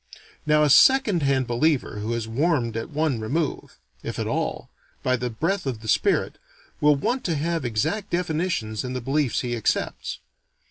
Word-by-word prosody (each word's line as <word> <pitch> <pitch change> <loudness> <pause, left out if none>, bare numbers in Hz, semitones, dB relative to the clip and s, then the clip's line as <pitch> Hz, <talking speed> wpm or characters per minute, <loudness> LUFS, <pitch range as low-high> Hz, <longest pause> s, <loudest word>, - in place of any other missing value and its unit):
Now, 150 0 +4
a 150 - +3
second 245 - +5
hand 135 -2 +2
believer 120 -1 0
who 110 +2 -3
is 115 -1 -3
warmed 125 -2 0
at 115 +5 -4
one 150 -5 0
remove 140 +7 -3 0.2
if - - -5
at - - -2
all - - -2 0.4
by 130 - +2
the 125 0 -3
breath 165 - -2
of 120 -5 -3
the 110 - -9
spirit, - - +1 0.4
will 150 0 +5
want 240 - -1
to 170 - 0
have 165 +1 -1
exact 130 - -1
definitions 165 - -1
in 125 0 -4
the 130 - -2
beliefs 135 +1 0
he 120 -1 -2
accepts. 115 - -2
140 Hz, 175 wpm, -24 LUFS, 120-165 Hz, 0.4 s, second